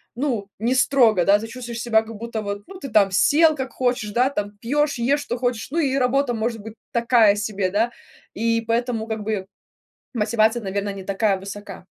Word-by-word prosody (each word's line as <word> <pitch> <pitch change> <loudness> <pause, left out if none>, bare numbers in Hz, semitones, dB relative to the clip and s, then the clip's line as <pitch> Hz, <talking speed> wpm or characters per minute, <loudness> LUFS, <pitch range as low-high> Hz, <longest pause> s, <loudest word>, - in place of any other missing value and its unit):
ну, 235 -7 -2
не 235 +4 0
строго, 240 -8 +4
да, 200 +1 +6
ты 220 - -6
чувствуешь 235 0 -7
себя 220 -1 +3
как 220 0 -10
будто 230 0 -5
вот, 200 0 -5
ну, 380 -1 -10
ты 275 - -7
там 205 -3 +4
сел 310 - +4
как 260 -3 -4
хочешь, 245 -4 -1
да, 250 +4 +2
там 205 -4 -4
пьешь, 290 +6 0
ешь 275 +5 +1
что 240 - -4
хочешь, 245 -2 -2
ну, 320 - -4
и 275 -5 +1
работа 265 0 +1
может 225 0 -2
быть 220 +1 -9 0.2
такая 235 -3 +4
себе, 205 -3 -2
да. 225 +5 +1 0.4
И 230 +1 0
поэтому, 230 0 -1
как 220 -1 -4
бы, 205 -3 -2 0.7
мотивация, 220 +1 +2
наверное, 200 +1 -3
не 195 -1 -8
такая 200 +1 +1
высока. 200 -1 -9
230 Hz, 195 wpm, -22 LUFS, 205-250 Hz, 0.7 s, да